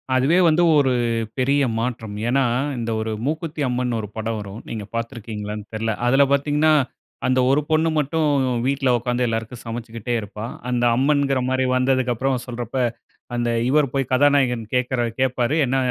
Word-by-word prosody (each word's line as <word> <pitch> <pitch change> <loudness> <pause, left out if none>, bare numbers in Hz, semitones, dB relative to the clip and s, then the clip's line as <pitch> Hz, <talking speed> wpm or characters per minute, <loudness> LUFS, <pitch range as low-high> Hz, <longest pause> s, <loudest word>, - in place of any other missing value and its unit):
அதுவே 135 +7 +3
வந்து 165 +2 +4
ஒரு 135 -3 +3 0.5
பெரிய 140 +2 +2 0.2
மாற்றம். 115 -3 -3
ஏனா, 135 +3 +2 0.4
இந்த 115 0 -2
ஒரு 110 0 -2
"மூக்குத்தி 155 +1 -3
அம்மன்னு" 125 -1 -1
ஒரு 105 - -6
படம் 110 0 -2
வரும். 105 +2 -8
நீங்க 110 -2 -4
பார்த்திருக்கீங்களானு 110 -3 -5
தெரியல. 110 +1 -1
அதில 135 +3 +5
பார்த்தீங்கனா 150 +2 +2 0.6
அந்த 130 0 +2
ஒரு 140 +3 +3
பொண்ணு 160 +1 +3
மட்டும் 155 +2 +1 0.4
வீட்ல 135 0 +1
உட்கார்ந்து 125 +1 -1
எல்லாருக்கும் 115 +1 -4
சமச்சுக்கிட்டே 115 0 -5
இருப்பா. 105 +1 -7 0.2
அந்த 120 -1 0
அம்மன்கிற 140 +1 +2
மாதிரி 130 0 +1
வந்ததுக்கப்புறம் 130 0 +1
சொல்றப்ப, 120 0 -6 0.6
அந்த 120 0 0 0.2
இவர் 145 0 +3
போய் 135 -2 -1
கதாநாயகன் 130 -3 +3
கேட்கிற 125 0 0 0.2
கேப்பாரு. 130 +1 +1
என்ன 135 +1 0
125 Hz, 145 wpm, -22 LUFS, 115-140 Hz, 0.6 s, அதில